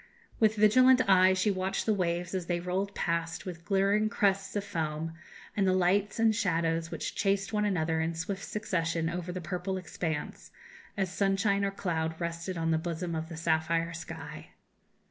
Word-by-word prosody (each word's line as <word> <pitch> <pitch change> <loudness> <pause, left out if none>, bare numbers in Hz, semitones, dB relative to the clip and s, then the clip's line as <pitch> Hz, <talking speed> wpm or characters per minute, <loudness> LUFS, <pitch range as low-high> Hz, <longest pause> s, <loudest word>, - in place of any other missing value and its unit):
With 220 -1 +4
vigilant 255 +4 +5
eye 185 -1 +6
she 190 +3 +2
watched 185 0 -2
the 220 - +3
waves 175 -2 -1
as 185 -2 -2
they 175 -1 0
rolled 185 +3 -2
past 165 -1 -2
with 170 -3 -7
glittering 200 +3 +2
crests 195 -2 +1
of 205 - 0
foam, 160 -4 -3 0.4
and 195 -2 +2
the 185 - +3
lights 190 +3 +2
and 225 -1 +3
shadows 165 -4 0
which - - -4
chased 195 +1 0
one 210 0 +1
another 160 -5 0
in 165 +1 -1
swift 185 +4 -4
succession 170 -6 -1
over 180 0 -4
the 185 - -4
purple 180 +3 -3
expanse, 165 -4 -4 0.5
as 190 -2 -1
sunshine 200 +1 +2
or 200 - +2
cloud 160 -5 -2
rested 170 +1 -3
on 165 0 0
the 160 - +2
bosom 170 +1 -3
of 160 0 -3
the 165 - -7
sapphire 165 +1 0
sky. 170 - -8
180 Hz, 175 wpm, -30 LUFS, 165-200 Hz, 0.5 s, eye